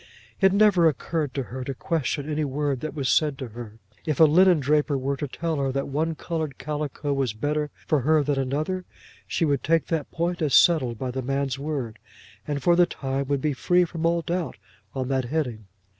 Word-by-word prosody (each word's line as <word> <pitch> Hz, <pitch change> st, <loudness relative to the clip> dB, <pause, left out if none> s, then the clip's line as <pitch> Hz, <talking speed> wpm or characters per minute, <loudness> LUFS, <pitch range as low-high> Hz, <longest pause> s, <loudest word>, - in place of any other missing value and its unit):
It 195 Hz, -1 st, +5 dB
never 200 Hz, -4 st, +5 dB
occurred 150 Hz, 0 st, -1 dB
to 135 Hz, -, -1 dB
her 130 Hz, +1 st, -6 dB
to 135 Hz, +1 st, -4 dB
question 150 Hz, -2 st, -2 dB
any 155 Hz, 0 st, -1 dB
word 140 Hz, -1 st, -1 dB
that 155 Hz, +2 st, -5 dB
was 140 Hz, -3 st, -2 dB
said 145 Hz, +4 st, +2 dB
to 130 Hz, -3 st, -6 dB
her. 110 Hz, -1 st, -9 dB, 0.3 s
If 155 Hz, -4 st, -2 dB
a -, -, +9 dB
linen 175 Hz, +2 st, +6 dB
draper 145 Hz, +1 st, +1 dB
were 135 Hz, +1 st, -1 dB
to 145 Hz, +1 st, -4 dB
tell 160 Hz, +4 st, -3 dB
her 135 Hz, -1 st, 0 dB
that 140 Hz, +1 st, -2 dB
one 160 Hz, +3 st, -1 dB
coloured 155 Hz, -3 st, -4 dB
calico 145 Hz, 0 st, -3 dB
was 135 Hz, -5 st, 0 dB
better 150 Hz, +6 st, -1 dB, 0.2 s
for 155 Hz, -, +2 dB
her 155 Hz, +3 st, +3 dB
than 140 Hz, -1 st, 0 dB
another, 155 Hz, +8 st, -2 dB, 0.4 s
she 165 Hz, -, 0 dB
would 140 Hz, -4 st, 0 dB
take 165 Hz, 0 st, +2 dB
that 160 Hz, -3 st, -1 dB
point 175 Hz, +1 st, -2 dB
as 150 Hz, -4 st, +2 dB
settled 130 Hz, -9 st, +4 dB
by 130 Hz, +2 st, -3 dB
the 130 Hz, +1 st, -3 dB
man's 135 Hz, +1 st, -2 dB
word, 140 Hz, -7 st, -4 dB, 0.5 s
and 145 Hz, -2 st, -3 dB
for 175 Hz, -, +5 dB
the 175 Hz, 0 st, +5 dB
time 135 Hz, -3 st, -3 dB
would 140 Hz, -1 st, 0 dB
be 150 Hz, 0 st, 0 dB
free 180 Hz, +6 st, +2 dB
from 165 Hz, -1 st, -2 dB
all 170 Hz, 0 st, +1 dB
doubt 175 Hz, +1 st, -3 dB, 0.4 s
on 130 Hz, -1 st, -2 dB
that 130 Hz, -2 st, 0 dB
heading. 120 Hz, -7 st, -3 dB
145 Hz, 210 wpm, -25 LUFS, 135-160 Hz, 0.5 s, a